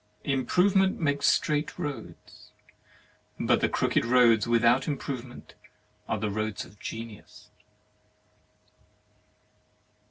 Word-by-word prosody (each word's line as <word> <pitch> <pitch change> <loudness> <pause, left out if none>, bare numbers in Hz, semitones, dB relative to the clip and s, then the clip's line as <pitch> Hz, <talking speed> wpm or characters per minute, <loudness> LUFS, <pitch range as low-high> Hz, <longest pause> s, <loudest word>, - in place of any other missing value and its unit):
Improvement 185 +8 +2
makes 140 -3 +1
straight 150 0 0
roads, 135 -7 -8 0.9
but - - +2
the - - +2
crooked - - +1
roads 120 -2 +4
without 120 +2 +3
Improve 140 -4 -3
ment 125 -2 -13 0.6
are 110 - 0
roads 110 +1 -3
of 100 +3 -19
Genius. 115 -2 -9
125 Hz, 90 wpm, -27 LUFS, 115-145 Hz, 0.9 s, roads